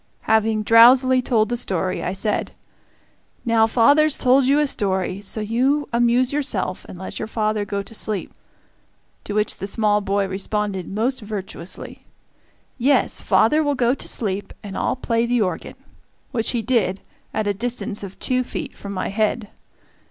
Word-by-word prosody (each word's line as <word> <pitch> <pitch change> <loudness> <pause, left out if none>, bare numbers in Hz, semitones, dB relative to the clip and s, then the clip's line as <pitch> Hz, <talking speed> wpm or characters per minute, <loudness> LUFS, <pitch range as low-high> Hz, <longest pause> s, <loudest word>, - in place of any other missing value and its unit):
Having 220 -1 +2
drowsily 255 +4 +6
told 225 -3 +1
the 240 - 0
story, 185 -6 -1
I - - -1
said, 210 +2 -2 0.9
"Now, 225 -1 +4
father's 285 +7 +4
told 260 +1 +4
you 275 +3 +3
a 300 - +3
story, 190 -6 -1
so 205 +2 -3
you 260 +7 +1
amuse 240 +2 +2
yourself 225 -11 -2
and - - -9
let 190 - -7 0.2
father 215 -2 -1
go 200 -1 -3
to 210 - -11
sleep"; 210 -3 -3 0.9
to 205 - -4
which 210 0 0
the 195 - -5
small 210 0 +1
boy 200 0 0
responded 195 0 -3
most 230 +6 -1
virtuously, 195 -4 -7 0.8
"Yes, 275 +4 +2
father 305 +1 +3
will 290 -2 0
go 245 -1 +2
to - - -5
sleep 205 -3 -2
and 200 -2 -7
I'll - - 0
play 235 -2 0
the 240 -1 +1
organ," 180 -4 -4 0.6
which 225 -4 0
he 235 -2 -1
did, 220 -7 0 0.3
at 215 - -2
a 205 - +1
distance 235 0 -3
of 195 -1 -8
two 255 0 0
feet - - -6
from 200 0 -7
my - - -2
head. 215 +1 -1
220 Hz, 160 wpm, -21 LUFS, 200-245 Hz, 0.9 s, drowsily